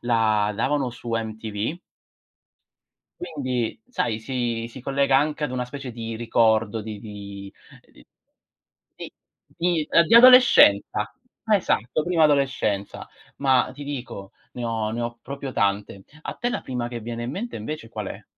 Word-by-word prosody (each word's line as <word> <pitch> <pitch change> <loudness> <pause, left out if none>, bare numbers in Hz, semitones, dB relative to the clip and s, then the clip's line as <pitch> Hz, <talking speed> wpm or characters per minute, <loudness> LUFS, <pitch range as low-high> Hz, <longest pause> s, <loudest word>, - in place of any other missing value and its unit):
la 110 -3 +2
davano 135 +3 0
su 120 0 -8
MTV. 110 +4 -3 1.4
Quindi 130 - -3
sai, 115 - -1
si 120 -1 -2
si 125 +2 -11
collega 135 +1 +2
anche 150 +2 +1
ad 140 - -3
una 125 -1 -2
specie 130 0 -8
di 115 -1 -5
ricordo 110 -1 +2
di 105 -1 -7
di 100 -2 -9 0.4
di - - -19 0.9
di - - -7 0.8
di - - -38 0.2
di 200 - +3
adolescenza. 235 - +7 0.3
Esatto, 175 - +1
prima 170 -3 +3
adolescenza. 135 -9 0 0.3
Ma 130 -2 +2
ti 145 +2 -9
dico, 125 -8 -7 0.2
ne 125 - -5
ho 110 -2 -1
ne 115 +2 -3
ho 120 0 -4
proprio 135 0 -6
tante. 100 -1 -1 0.2
A - - -5
te 240 - -2
la - - -2
prima 125 -2 -4
che 120 -1 -6
viene 115 +1 -5
in 120 - -3
mente 220 - -5
invece 115 +2 -6
qual 105 -3 -6
è? - - -9
120 Hz, 145 wpm, -24 LUFS, 110-140 Hz, 1.4 s, adolescenza